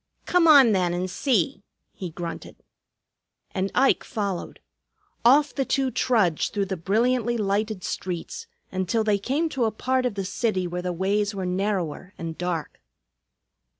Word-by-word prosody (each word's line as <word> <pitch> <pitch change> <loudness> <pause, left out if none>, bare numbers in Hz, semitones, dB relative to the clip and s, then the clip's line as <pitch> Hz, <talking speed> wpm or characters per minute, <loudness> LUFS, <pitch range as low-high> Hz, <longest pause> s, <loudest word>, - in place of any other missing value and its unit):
"Come 355 -2 +3
on, 280 -7 +8
then, 180 -3 +1
and 180 +1 -1
see," 195 - 0 0.3
he 185 - -6
grunted. 170 +1 -7 0.9
And 190 +1 -2
Ike 270 +2 +3
followed. 200 -6 -4 0.6
Off 285 +5 +5
the 275 - 0
two 265 0 0
trudged, 210 -13 +1
through 200 -1 +1
the 190 0 -3
brilliantly 235 +6 +1
lighted 205 -1 -1
streets, 180 -2 -5 0.2
until 190 +4 0
they 210 -2 +2
came 280 +11 0
to 260 -6 0
a 220 - +1
part 255 +4 0
of 225 - -5
the 195 -1 -3
city 200 -2 -1
where 175 0 -3
the 180 0 -2
ways 200 +3 0
were 190 -1 -3
narrower 185 -1 -2
and 165 -1 -5
dark. 175 -3 -4
200 Hz, 150 wpm, -25 LUFS, 180-240 Hz, 0.9 s, on